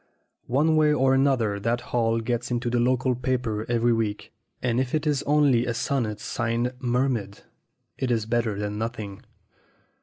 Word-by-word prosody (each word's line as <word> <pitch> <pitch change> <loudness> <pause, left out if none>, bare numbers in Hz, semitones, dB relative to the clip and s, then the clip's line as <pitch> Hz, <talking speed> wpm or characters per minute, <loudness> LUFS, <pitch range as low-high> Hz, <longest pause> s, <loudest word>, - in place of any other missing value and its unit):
One 155 +5 +2
way 155 -1 +4
or 135 -2 +3
another 130 -7 +2
that 115 +4 0
Hall 115 -1 +2
gets 120 +1 -2
into 120 0 -1
the 120 - +1
local 125 +1 +2
paper 120 -3 -2
every 120 0 +2
week; 110 -2 -2 0.3
and 125 -1 0
if 130 +2 -1
it 155 0 -1
is 145 -3 +1
only 140 -5 +3
a 120 - -1
sonnet, 115 -4 -1
signed 120 +3 -1
"Mer 125 +1 +1
maid," 100 -6 -3 0.6
it 130 - -1
is 115 -3 +1
better 115 -2 0
than 105 0 -3
nothing. 110 -4 -5
120 Hz, 170 wpm, -25 LUFS, 115-130 Hz, 0.6 s, way